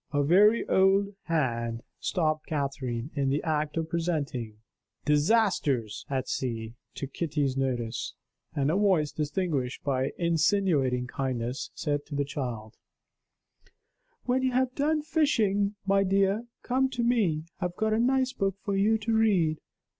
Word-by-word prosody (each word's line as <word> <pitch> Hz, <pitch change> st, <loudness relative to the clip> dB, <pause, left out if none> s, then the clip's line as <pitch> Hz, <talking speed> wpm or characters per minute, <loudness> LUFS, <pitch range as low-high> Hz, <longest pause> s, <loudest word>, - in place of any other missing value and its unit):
A 145 Hz, -, 0 dB
wary 205 Hz, +9 st, +5 dB
old 195 Hz, +1 st, +3 dB
hand 120 Hz, -8 st, -1 dB, 0.2 s
stopped 155 Hz, -3 st, -1 dB
Catherine, 135 Hz, -3 st, -3 dB
in 140 Hz, -2 st, 0 dB
the 140 Hz, +2 st, 0 dB
act 155 Hz, -1 st, -1 dB
of 160 Hz, -1 st, -1 dB
presenting 150 Hz, -10 st, -2 dB, 0.5 s
"Disasters 150 Hz, -, +1 dB
at 130 Hz, -2 st, -1 dB
Sea," 115 Hz, -3 st, -3 dB, 0.2 s
to -, -, -4 dB
Kitty's 145 Hz, -2 st, -1 dB
notice; 125 Hz, -4 st, -2 dB, 0.4 s
and 140 Hz, +1 st, +1 dB
a -, -, +1 dB
voice, 190 Hz, -7 st, +2 dB
distinguished 150 Hz, -4 st, -2 dB
by 135 Hz, 0 st, 0 dB
insinuating 165 Hz, -7 st, +2 dB
kindness, 125 Hz, 0 st, -3 dB
said 145 Hz, -2 st, -1 dB
to 145 Hz, -, -6 dB
the 140 Hz, 0 st, 0 dB
child: 120 Hz, -6 st, -5 dB, 1.5 s
"When 255 Hz, +1 st, +1 dB
you 260 Hz, -1 st, 0 dB
have 255 Hz, 0 st, +1 dB
done 300 Hz, +2 st, +1 dB
fishing, 215 Hz, -11 st, +1 dB
my 195 Hz, 0 st, +3 dB
dear, 195 Hz, +4 st, +1 dB, 0.2 s
come 265 Hz, +1 st, +1 dB
to 240 Hz, -, +1 dB
me; 205 Hz, -11 st, +2 dB, 0.2 s
I 185 Hz, -, -1 dB
have 175 Hz, 0 st, -3 dB
got 220 Hz, +1 st, 0 dB
a 220 Hz, -, +2 dB
nice 260 Hz, +1 st, +2 dB
book 195 Hz, -5 st, -1 dB
for 200 Hz, -, -1 dB
you 210 Hz, +3 st, +3 dB
to 225 Hz, +1 st, -2 dB
read. 185 Hz, -8 st, +3 dB
160 Hz, 145 wpm, -28 LUFS, 135-205 Hz, 1.5 s, wary